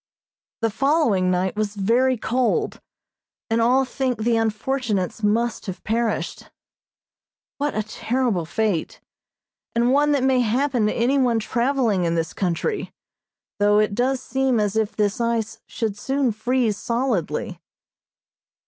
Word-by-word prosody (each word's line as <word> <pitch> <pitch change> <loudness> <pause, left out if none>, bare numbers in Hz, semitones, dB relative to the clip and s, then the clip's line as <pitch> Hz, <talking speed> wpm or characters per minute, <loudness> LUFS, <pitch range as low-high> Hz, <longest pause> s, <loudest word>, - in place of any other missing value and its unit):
The 225 -1 +1
following 255 - +2
night 185 +1 0
was 210 -1 -2
very 240 +6 +2
cold, 255 - 0 0.7
and 230 +1 +2
all 255 +3 +3
think 255 -1 -2
the 235 0 +2
unfortunates 225 -2 -1
must 225 +2 0
have 185 - -6
perished. 225 0 -2 1.1
What 290 +1 -1
a 215 - 0
terrible 220 -4 -1
fate, 205 -4 -1 0.8
and 240 +2 +3
one 295 +1 +3
that 275 -3 +1
may 260 -1 +3
happen 245 0 +1
to - - +1
any 255 +4 +2
one 245 -3 +2
traveling 235 -4 +1
in 170 0 0
this 165 -1 -2
country, 190 - -2 0.7
though 205 0 +4
it 210 -1 +2
does 255 +3 0
seem 265 -3 +1
as 210 -1 0
if 220 -1 0
this 205 +1 0
ice 230 -2 -1
should 220 -4 -3
soon 270 +3 0
freeze 225 0 0
solidly. 235 - -2
230 Hz, 135 wpm, -23 LUFS, 210-260 Hz, 1.1 s, though